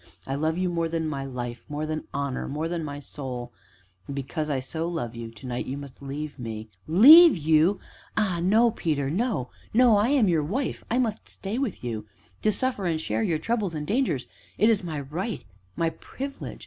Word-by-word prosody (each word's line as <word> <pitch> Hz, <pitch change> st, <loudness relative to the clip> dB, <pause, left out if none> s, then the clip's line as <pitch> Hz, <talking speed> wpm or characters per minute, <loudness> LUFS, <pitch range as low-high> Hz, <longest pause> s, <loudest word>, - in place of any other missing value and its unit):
"I 135 Hz, -, -3 dB
love 155 Hz, +4 st, 0 dB
you 185 Hz, 0 st, +1 dB
more 170 Hz, -2 st, 0 dB
than 165 Hz, -1 st, -1 dB
my 140 Hz, -3 st, -3 dB
life 120 Hz, -2 st, -5 dB
more 150 Hz, +1 st, -3 dB
than 155 Hz, 0 st, -3 dB
honor 140 Hz, -2 st, -2 dB
more 150 Hz, +3 st, -2 dB
than 170 Hz, -1 st, -2 dB
my 145 Hz, -1 st, -5 dB
soul; 125 Hz, -4 st, -6 dB, 0.5 s
and, 140 Hz, -, -5 dB
because 150 Hz, +3 st, -3 dB
I 140 Hz, -3 st, 0 dB
so 160 Hz, +6 st, -3 dB
love 140 Hz, -9 st, -3 dB
you 115 Hz, -1 st, -6 dB
to 115 Hz, +1 st, -13 dB
night 125 Hz, -1 st, -3 dB
you 135 Hz, -, -3 dB
must 140 Hz, -2 st, -10 dB
leave 145 Hz, +1 st, -5 dB
me 110 Hz, -2 st, -6 dB
" -, -, -34 dB, 0.2 s
"Leave 325 Hz, -, +11 dB
you? 160 Hz, +5 st, +3 dB, 0.4 s
ah 190 Hz, -6 st, +1 dB
no, 220 Hz, +6 st, +4 dB
Peter 145 Hz, -8 st, -1 dB
no 195 Hz, -, -1 dB, 0.2 s
no, 240 Hz, -3 st, +6 dB
I 210 Hz, +4 st, +3 dB
am 270 Hz, -7 st, +4 dB
your 165 Hz, -4 st, +3 dB
wife 245 Hz, -, -2 dB
I 235 Hz, -, +1 dB
must 225 Hz, -4 st, -1 dB
stay 205 Hz, +5 st, -4 dB
with 265 Hz, -, -3 dB
you 110 Hz, -3 st, -4 dB, 0.3 s
to 215 Hz, -, +3 dB
suffer 230 Hz, -5 st, -1 dB
and 160 Hz, -2 st, 0 dB
share 110 Hz, -7 st, -1 dB
your 155 Hz, +8 st, +1 dB
troubles 210 Hz, -2 st, -1 dB
and 150 Hz, -1 st, -3 dB
dangers 200 Hz, -, 0 dB, 0.3 s
it 220 Hz, +2 st, +5 dB
is 205 Hz, -4 st, +1 dB
my 155 Hz, -4 st, -3 dB
right 175 Hz, -, -4 dB, 0.3 s
my 165 Hz, -1 st, +1 dB
privilege. 275 Hz, +9 st, -7 dB
160 Hz, 205 wpm, -26 LUFS, 135-205 Hz, 0.5 s, Leave